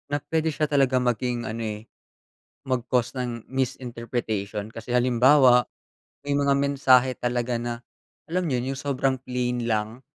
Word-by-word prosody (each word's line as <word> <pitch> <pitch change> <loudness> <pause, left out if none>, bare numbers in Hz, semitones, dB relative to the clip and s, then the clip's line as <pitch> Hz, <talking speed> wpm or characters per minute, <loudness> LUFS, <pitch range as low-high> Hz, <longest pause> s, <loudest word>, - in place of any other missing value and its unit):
Na 145 - 0
puwede 160 0 0
siya 155 0 0
talaga 135 -3 +2
maging 125 -1 -1
ano 115 +1 -4
eh, 105 -2 -3 0.9
mag 130 -3 0
cause 125 0 0
ng 120 -3 -4
misinterpretation. 115 -5 -3
Kasi 115 +2 -6
halimbawa, 125 0 +5 0.6
may 145 - -2
mga 140 -1 +3
mensahe 135 -2 +4
talaga 120 0 -1
na, 120 0 -3 0.6
alam 180 +1 0
niyo 130 -4 0
'yun, - - -5
'yung 135 - -6
sobrang 135 -1 0
plain 125 -1 -2
lang, 110 +1 -1
125 Hz, 150 wpm, -25 LUFS, 120-135 Hz, 0.9 s, halimbawa